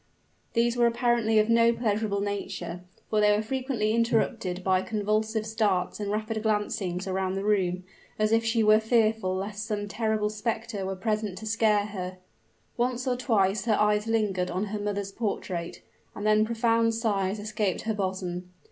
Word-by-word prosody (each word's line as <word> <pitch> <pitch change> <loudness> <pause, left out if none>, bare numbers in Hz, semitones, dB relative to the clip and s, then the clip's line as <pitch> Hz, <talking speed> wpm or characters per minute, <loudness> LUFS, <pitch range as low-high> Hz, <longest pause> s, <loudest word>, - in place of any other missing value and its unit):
These 235 +1 +2
were 240 -1 +5
apparently 235 -2 +2
of 215 0 +4
no 230 0 +5
pleasurable 215 -3 0
nature; 195 -4 -4 0.3
for 215 -1 +3
they 210 0 +5
were 215 - -1
frequently 250 -2 -1
interrupted 225 -5 0
by 185 0 +3
convulsive 215 +1 -1
starts 215 -5 0
and 205 -1 -3
rapid 215 +1 -2
glancings 205 -4 -1
around 190 0 -1
the 195 - -2
room 185 -3 +1 0.3
as 215 0 +1
if 225 0 +3
she 225 0 +2
were 215 0 +6
fearful 220 -4 +2
lest 205 +2 -4
some 210 -2 -3
terrible 215 0 0
specter 220 -2 -3
were 190 - -3
present 210 -1 -2
to 220 - -7
scare 215 -2 +2
her. 185 -3 -6 0.6
Once 250 +1 0
or 255 -1 +1
twice 210 -5 +1
her 220 -3 +3
eyes 210 +1 +2
lingered 205 -5 0
on 185 +4 -1
her 210 - -2
mother's 205 -1 -3
portrait; 190 -5 -4 0.3
and - - -5
then 215 0 +4
profound 230 0 +2
sighs 205 -3 0
escaped 210 -2 -2
her 220 - -1
bosom. 185 -3 -3
215 Hz, 165 wpm, -27 LUFS, 195-225 Hz, 0.6 s, were